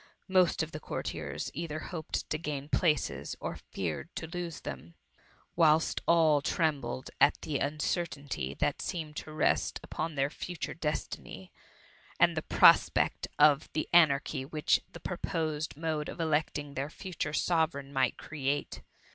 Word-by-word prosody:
Most 185 -4 +3
of 160 - -6
the 155 - -6
courtiers - - -4
either 155 0 -4
hoped 160 0 -4
to 155 - 0
gain 145 -3 -4
places, 155 - +1
or - - -4
feared 90 - -3
to - - -4
lose 170 -1 -5
them, 85 +1 -7 0.6
whilst 160 -1 +4
all 160 -3 +5
trembled 145 -6 -1
at 145 - +5
the 145 -3 -1
uncertainty 145 - -2
that - - 0
seemed 155 -4 -4
to 155 - -6
rest 155 0 +1
upon 160 0 -4
their 140 +1 +1
future 175 +1 -5
destiny, 150 - -4 0.7
and - - +5
the - - 0
prospect - - +5
of 150 0 +5
the 155 - -1
anar 155 -5 +7
chy 130 - -3
which 150 +2 +1
the 175 - -10
purposed 160 -4 -3
mode 155 -1 -2
of - - -8
electing 150 -2 0
their 140 +1 -3
future 165 -2 -4
Sovereign 155 -4 0
might 130 -2 +1
create. 145 -1 -3
155 Hz, 145 wpm, -31 LUFS, 140-165 Hz, 0.7 s, anar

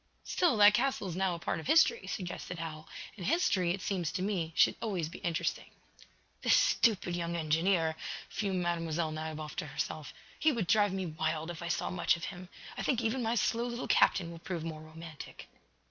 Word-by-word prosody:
"Still, 340 -10 +2
that 205 0 +8
castle 250 -3 +1
is 175 - -4
now 185 -1 +1
a - - -5
part - - -2
of 160 - -7
history," 400 +9 +4
suggested 180 -2 -5
Hal, 160 -1 -6 0.3
"and 195 - -8
history, 190 - +2
it 185 +2 -1
seems 180 -5 -1
to 185 - -2
me, 185 -5 -1
should - - +5
always 185 -8 -2
be - - -9
interesting." 170 -2 -2 0.7
"This - - +5
stupid 200 -6 +3
young 170 0 -2
engineer!" 165 +1 +2 0.3
fumed 190 -3 -1
Mlle. 165 -2 -1
Nadiboff, 155 -1 -5
to - - -3
herself. 150 +2 -4 0.3
"He 315 - +4
would 230 -8 -1
drive 205 0 +4
me 190 -1 -2
wild, 160 0 -2
if 170 - -8
I 170 - -4
saw 170 - -1
much 175 -1 +2
of 170 - -11
him. 180 -1 -8 0.3
I - - -4
think 255 - +1
even 240 +2 0
my 230 0 0
slow 235 +1 +1
little 240 +1 -4
captain 170 -3 +3
will 165 - -9
prove 170 -1 -4
more 160 -2 -5
romantic." 160 0 -10
175 Hz, 195 wpm, -32 LUFS, 160-205 Hz, 0.7 s, that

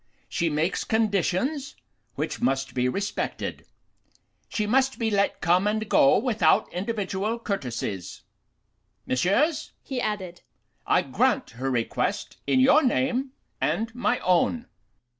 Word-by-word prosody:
She 170 - 0
makes 155 +4 0
conditions 225 - 0 0.4
which - - -3
must 135 -1 0
be 125 0 +1
respected. 200 +9 -3 0.8
She 215 - -1
must 265 +4 +2
be 225 -2 0
let 200 -1 +1
come 180 +4 +3
and 215 +1 -1
go 275 0 +5
without 220 -9 +2
individual 205 +2 -2
courtesies. 125 - -4 0.8
Messieurs,' 280 - +1
he 260 -3 -3
added, 190 -6 -3 0.5
'I - - +4
grant - - +1
her 130 +3 -3
request 120 -3 -2
in 260 - +3
your 270 +4 +6
name 260 0 0 0.3
and 225 +1 0
my 245 0 +1
own. 185 +7 +2
210 Hz, 120 wpm, -26 LUFS, 175-250 Hz, 0.8 s, your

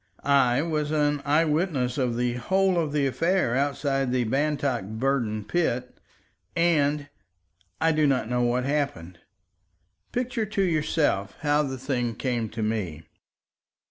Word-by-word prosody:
I 140 -1 +3
was 155 -3 -1
an 150 -1 +1
eye 150 +3 +3
witness 150 -5 0
of 125 -3 0
the 120 0 0
whole 190 +8 +1
of 155 -3 -1
the 145 -1 +1
affair 165 -1 +1
outside 135 -1 0
the 125 -1 +1
Bantock 140 -1 0
Burden 110 0 -1
pit, 125 -8 -1 0.6
and—I 140 - -1
do 155 -1 +3
not 130 -5 +1
know 125 +1 0
what 120 +1 +1
happened. 135 - -2 0.9
Picture 245 -3 -2
to 195 -1 0
yourself 155 - 0
how 150 0 +2
the 135 -3 -3
thing 125 -3 -2
came 120 -3 -2
to 110 +1 -4
me. 95 -8 -2
135 Hz, 135 wpm, -26 LUFS, 120-150 Hz, 0.9 s, I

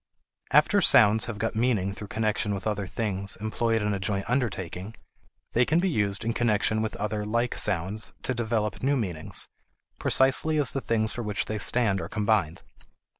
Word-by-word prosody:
After - - +4
sounds 105 +2 +5
have 115 -2 -5
got 110 +1 -2
meaning 110 -5 +1
through 105 +1 -8
connection 110 -1 -1
with 95 - -7
other 105 -2 -2
things 100 +1 -2
employed 110 +1 -1
in 105 0 0
a 100 - -2
joint 100 +1 -2
undertaking, 105 - -3 0.6
they 120 - +4
can 155 +6 +1
be 185 +1 +1
used 105 -4 -1
in 115 - 0
connection 110 -2 +1
with 110 - -3
other 105 0 -3
like 115 +3 -1
sounds 95 +4 +2
to 130 - 0
develop 110 -3 -2
new 140 +2 +1
meanings, 90 -10 -4 0.5
precisely 135 +4 +3
as 145 -3 +2
the 135 - -3
things 110 -2 0
for 120 - -5
which 105 -3 -2
they 110 -1 -4
stand 105 -4 +1
are - - -6
combined. 105 -6 0
110 Hz, 175 wpm, -26 LUFS, 100-115 Hz, 0.6 s, sounds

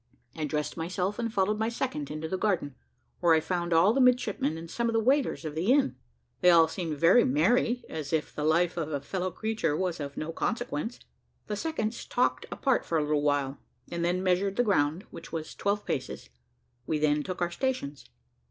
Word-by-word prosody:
I 155 - -2
dressed 150 0 -2
myself 185 +5 -2
and 230 -1 -1
followed 210 0 +1
my 220 +1 +1
second 230 - -3
into 155 +1 -4
the 190 - -2
garden, 185 -8 0 0.5
where 170 -2 +5
I - - +4
found 175 +1 -2
all 170 +6 +5
the 270 - +2
midshipmen 245 - +2
and 165 +1 -8
some 235 +7 -1
of - - -1
the 225 - +3
waiters 260 - +1
of 155 - -4
the 170 +9 +1
inn. 275 0 +3 0.4
They 180 - +5
all 165 -2 +7
seemed 165 -5 -4
very 180 +11 +6
merry, 235 - +2
as 150 -3 -5
if 160 -1 -1
the 150 - -4
life 170 +3 +2
of 155 -2 -2
a 145 - -1
fellow 185 +6 -3
creature 185 -5 -1
was 180 -3 -1
of 140 -1 -6
no 155 +1 -3
consequence. 230 +1 -3 0.4
The 210 - -3
seconds 235 -4 -3
talked 250 - 0
apart 265 -3 +1
for 165 - -1
a 155 - +2
little 150 0 +1
while, 145 -2 0 0.3
and 170 0 -2
then 180 +2 0
measured 190 +1 +1
the 245 - +3
ground, 175 -4 +1
which 165 - -10
was 160 -1 -5
twelve 205 +1 -1
paces; 130 - -4 0.6
we 155 - +1
then 150 0 +2
took 185 +3 -5
our 175 -1 0
stations. 170 - -3
175 Hz, 205 wpm, -28 LUFS, 155-215 Hz, 0.6 s, all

